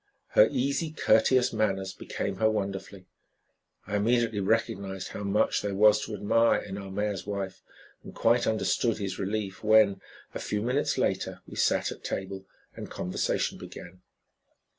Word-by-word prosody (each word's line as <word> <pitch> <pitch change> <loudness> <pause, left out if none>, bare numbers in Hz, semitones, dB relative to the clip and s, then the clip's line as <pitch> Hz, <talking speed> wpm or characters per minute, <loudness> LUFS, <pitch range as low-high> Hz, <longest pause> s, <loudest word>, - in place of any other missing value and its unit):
Her 105 - +6
easy, 140 +5 -1
courteous 125 -3 +3
manners 95 -3 0
became 100 -1 -4
her 110 +2 +3
wonderfully. 95 -2 -4 0.8
I 105 0 -1
immediately 115 0 +1
recognized 95 -2 -1
how - - -7
much 100 +1 +1
there 100 -1 -3
was 105 +1 +5
to 110 - -5
admire 115 +3 +3
in 100 -2 -7
our 100 -1 -8
mayor's 100 0 -3
wife, 100 -2 -4 0.4
and - - -9
quite 120 +2 +3
understood 110 +1 +1
his 100 -2 -4
relief 100 0 -3
when, 110 -3 +5 0.3
a - - -4
few 105 0 -2
minutes 125 +5 0
later, - - -1
we - - -11
sat - - +1
at - - -10
table 95 0 -5 0.3
and - - -7
conversation 90 - -2
began. 90 +1 -11
105 Hz, 150 wpm, -28 LUFS, 95-110 Hz, 0.8 s, Her